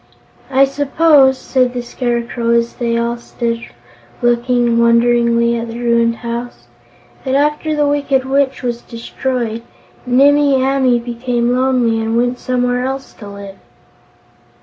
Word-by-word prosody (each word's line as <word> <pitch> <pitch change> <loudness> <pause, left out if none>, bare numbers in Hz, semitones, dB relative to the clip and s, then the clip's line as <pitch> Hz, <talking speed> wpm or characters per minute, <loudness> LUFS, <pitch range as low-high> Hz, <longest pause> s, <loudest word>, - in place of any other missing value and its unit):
"I 270 0 +4
suppose," 280 -1 +3
said 255 -1 0
the 245 - -3
Scarecrow, 235 -1 -2
as 235 0 0
they 235 -1 -2
all 235 +1 -1
stood 235 0 -4 0.6
looking 240 0 +1
wonderingly 235 0 +3
at 230 0 -4
the 230 0 -7
ruined 235 -1 +1
house, 235 +1 -6 0.6
"that 265 -1 -1
after 300 +2 0
the 295 -1 +1
Wicked 280 -2 0
Witch 270 0 0
was 240 -1 -3
destroyed, 235 -1 -4 0.5
Nimmie 280 +2 +4
Amee 260 -1 +2
became 240 0 -2
lonely 250 -3 +1
and 225 +1 -1
went 245 +1 0
somewhere 250 0 -1
else 270 +1 -5
to 210 - -12
live." 200 -1 -10
245 Hz, 130 wpm, -16 LUFS, 235-265 Hz, 0.6 s, I